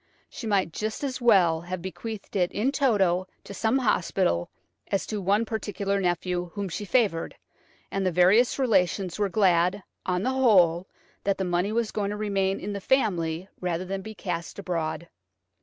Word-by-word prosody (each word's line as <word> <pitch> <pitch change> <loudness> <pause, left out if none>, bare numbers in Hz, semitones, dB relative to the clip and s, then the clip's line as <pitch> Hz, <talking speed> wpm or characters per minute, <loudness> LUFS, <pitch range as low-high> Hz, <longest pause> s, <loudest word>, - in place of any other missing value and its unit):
She 230 - -6
might 195 -6 +1
just 215 +5 -3
as 260 -2 -3
well 180 -9 +4
have 180 +1 -5
bequeathed 205 +5 -7
it 180 -2 +2
in 240 +6 0
toto 195 -10 +2 0.2
to - - -9
some 220 +5 +1
hospital 185 - +1 0.4
as 195 - -1
to 210 -2 -4
one 200 +4 +2
particular 200 -2 -2
nephew 180 0 -1
whom 200 -2 -3
she 180 +5 -4
favoured, 205 -7 +1 0.6
and 195 - -1
the 185 - +1
various 185 +8 +4
relations 195 -7 +1
were 205 -1 +1
glad, 185 -1 +2 0.2
on 180 0 -1
the 260 - +1
whole, 185 -9 +4 0.4
that 200 -1 +1
the 190 - -1
money 180 +3 0
was 230 -1 0
going 205 -2 -1
to 210 - -4
remain 195 -2 0
in 205 +2 -4
the 200 - -5
family 180 -9 0
rather 180 0 -2
than 195 +1 -4
be 220 +2 -9
cast 170 -4 -4
abroad. 170 -3 -3
195 Hz, 175 wpm, -26 LUFS, 180-215 Hz, 0.6 s, well